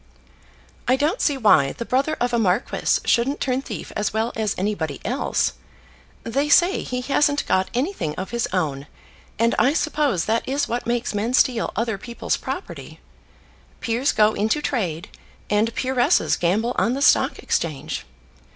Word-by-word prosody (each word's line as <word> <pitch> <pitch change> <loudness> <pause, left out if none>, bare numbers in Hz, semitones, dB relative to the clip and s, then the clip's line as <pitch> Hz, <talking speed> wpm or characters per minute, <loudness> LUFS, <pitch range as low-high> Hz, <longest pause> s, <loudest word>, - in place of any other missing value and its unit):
"I 255 - +4
don't 300 - 0
see 290 -3 +1
why 155 - +4
the 235 - -6
brother 275 +6 0
of 245 0 0
a 235 - +2
marquis 200 +2 +1
shouldn't 265 +5 +1
turn 260 0 0
thief - - -7
as 210 -1 -1
well 220 +2 -1
as 215 -2 -1
anybody 180 -7 -2
else. 250 +6 0 0.7
They 275 +6 -1
say 350 +5 +4
he 250 0 -4
hasn't 285 +2 +1
got 185 0 +1
anything 250 - -2
of 190 - -6
his 235 -1 -1
own; 145 -6 -2 0.5
and 230 +1 +2
I 255 +6 +4
suppose 295 - 0
that 225 +3 -1
is 280 +2 0
what 240 0 -3
makes 240 -1 -1
men 220 +5 0
steal 245 -3 +2
other 225 -3 -1
people's 235 +3 -3
property. - - -7 0.8
Peers 240 +4 0
go 215 0 +3
into 220 +8 0
trade, 185 - -2 0.4
and 210 +2 +2
peeresses 255 -1 +2
gamble 215 +8 0
on 235 - +2
the 280 - -1
Stock - - +4
Exchange. 155 -5 -2
235 Hz, 160 wpm, -22 LUFS, 205-265 Hz, 0.8 s, I